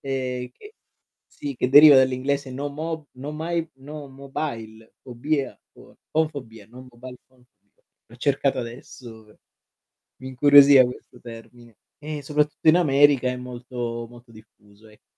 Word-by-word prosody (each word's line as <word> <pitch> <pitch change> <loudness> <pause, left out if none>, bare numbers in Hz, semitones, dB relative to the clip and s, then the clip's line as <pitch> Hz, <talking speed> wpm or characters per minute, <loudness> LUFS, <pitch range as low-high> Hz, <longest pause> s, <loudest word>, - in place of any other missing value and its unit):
e 130 -2 -4
che 415 - -16 0.5
sì, 140 -1 -8
che 125 - -2
deriva 145 +2 +8
dall'inglese 130 +1 0
no 140 +3 -5
mo 155 +1 -6
no 135 +3 -8
my 165 +1 -3
no 145 +1 -10
mobile 115 -5 -8
fobia 135 +3 -3 0.2
fo - - -19
phone 160 0 +1
fobia, 115 -8 -11
no 125 +3 -14
mobile 125 +1 -12
phone 130 -1 -28
fobia, 100 - -44 0.2
l'ho 120 - -17
cercata 135 0 0
adesso 115 -1 -11
pe 105 - -23 0.8
mi 130 - -7
incuriosiva 140 0 +6
questo 125 0 -9
termine 115 -1 -14 0.2
e 150 -1 -7
soprattutto 150 +2 -2
in 155 - +6
America 145 -5 +3
è 125 - -3
molto, 120 -1 -6
molto 120 0 -17
diffuso 105 -1 -20
ecco, 105 - -22
130 Hz, 145 wpm, -23 LUFS, 120-145 Hz, 0.8 s, deriva